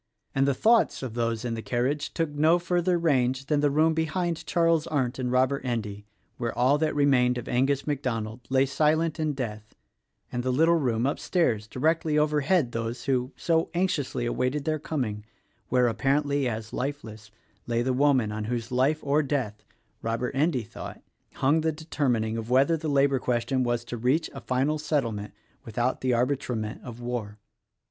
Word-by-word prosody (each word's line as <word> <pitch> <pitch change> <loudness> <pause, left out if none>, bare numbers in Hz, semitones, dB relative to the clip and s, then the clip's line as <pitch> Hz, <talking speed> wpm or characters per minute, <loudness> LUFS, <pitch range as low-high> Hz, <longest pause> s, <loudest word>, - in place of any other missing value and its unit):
And 135 +1 +2
the 140 - +2
thoughts 225 - +3
of 125 -4 -4
those 115 0 -1
in 120 - -1
the 115 - -4
carriage 130 +6 -1
took 165 -3 0
no 155 +4 +4
further 175 0 +1
range 135 -5 +1
than 150 0 +1
the 145 0 +3
room 155 +3 +3
behind 160 +1 -2
Charles 165 -1 +2
Arndt 135 -5 -1
and 125 -1 -1
Robert 130 +2 +2
Endy 105 -5 -4 0.3
where 120 -2 -3
all 130 +4 +3
that 155 -1 0
remained 130 -4 +3
of 120 - -6
Angus 135 +3 +1
MacDonald 120 -6 -2
lay 130 0 +3
silent 155 +4 +1
in 155 -1 0
death 110 -5 -6 0.6
and 120 - -2
the 130 - -2
little 160 +6 +4
room 120 -5 0
upstairs 135 - 0
(directly 155 +5 +1
overhead 150 -1 +2
those 115 +1 -4
who 130 -1 0
so 165 -1 +1
anxiously 160 -9 0
awaited 130 +4 -1
their 155 -1 0
coming) 120 -9 -3 0.5
where, 125 -1 +3
appar 135 +5 +1
ently 140 -2 0
as 110 -1 -6
lifeless, 110 -6 -5 0.4
lay 120 0 +1
the 130 +1 0
woman 130 -5 +3
on 105 0 -4
whose 120 +1 -3
life 135 +5 +2
or 145 +2 +2
death, 130 -8 -2 0.2
— - - -44
Robert 115 +3 -2
Endy 140 -3 +1
thought, 115 - -9 0.2
— - - -38
hung 150 +4 +4
the 160 0 +1
determining 130 -8 -1
of 115 0 -5
whether 135 +6 +4
the 160 -1 -3
labor 140 -1 +3
question 125 +2 0
was 120 -1 -1
to 120 - -5
reach 130 +8 +1
a - - -8
final 135 +4 0
settlement 115 -9 -1 0.3
without 120 +3 -1
the 130 - +1
arbitrament 120 -3 -1
of 120 -2 -8
war. 120 -4 -4
130 Hz, 180 wpm, -27 LUFS, 120-150 Hz, 0.6 s, no